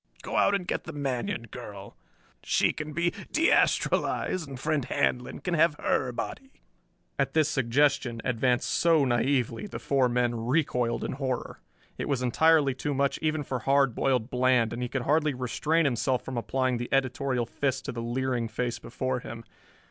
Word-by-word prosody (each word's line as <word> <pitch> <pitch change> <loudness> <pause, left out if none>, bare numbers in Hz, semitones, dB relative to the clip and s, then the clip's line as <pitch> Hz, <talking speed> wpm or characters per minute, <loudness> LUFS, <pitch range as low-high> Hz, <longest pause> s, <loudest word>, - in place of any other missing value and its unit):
"Go - - -5
out 200 - +4
and 190 -3 -2
get - - -3
the 160 - -7
Manion 140 - -2
girl. 100 -5 -9 0.5
She - - +2
can 155 0 -6
be 170 +3 0 0.2
de 320 +3 +3
astralized 180 -5 +1
and 135 -2 -8
friend 150 0 0
Handlon 125 0 -1
can 180 - -1
have 165 -1 +4
her 130 -3 0
body." 265 - -7 0.6
At - - 0
this 155 -2 +4
suggestion, 135 -3 +1
advanced 125 0 +1
so 165 -4 +3
naïvely, 125 - 0
the - - -5
four 135 -3 +1
men 120 0 +1
recoiled 125 -4 +1
in - - -2
horror. 130 -2 -3 0.4
It - - -3
was 135 -3 0
entirely 150 +2 +4
too 140 +2 -3
much 140 0 +1
even 155 -1 0
for 130 -2 -3
Hard 135 0 +3
Boiled 125 -2 0
Bland, 125 -2 +2
and 120 - -4
he 125 - -2
could 135 -1 -2
hardly 150 0 +2
restrain 150 +6 0
himself 130 -1 0
from 130 - -5
applying 130 +1 0
the 120 +1 -5
editorial 130 -2 0
fist 135 +2 -2
to - - -3
the 115 - -5
leering 120 0 -1
face 120 +2 -3
before 130 +1 -3
him. 115 -1 -8
130 Hz, 175 wpm, -28 LUFS, 120-150 Hz, 0.6 s, out